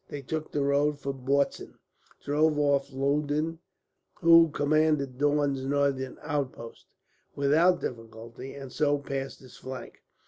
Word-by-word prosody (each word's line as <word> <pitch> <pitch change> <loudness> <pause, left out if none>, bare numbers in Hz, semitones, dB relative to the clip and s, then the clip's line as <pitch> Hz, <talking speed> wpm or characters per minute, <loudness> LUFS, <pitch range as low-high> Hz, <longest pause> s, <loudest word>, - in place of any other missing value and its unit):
They 145 -1 -6
took 155 +4 -4
the 145 - 0
road 145 +1 +2
for 140 -1 -3
Bautzen, 135 +2 -1 0.5
drove 150 +1 +2
off 140 -2 +1
Loudon 145 +4 -1 0.6
(who 165 -1 +7
commanded 145 -3 +1
Daun's 145 -2 +1
northern 135 -1 0
outposts) 140 -6 -4 0.5
without 155 +6 +3
difficulty, 115 +2 -7
and 135 -2 -9
so 145 -1 +1
passed 135 -1 -5
his 130 - -15
flank. 130 0 -9
140 Hz, 125 wpm, -28 LUFS, 135-150 Hz, 0.6 s, who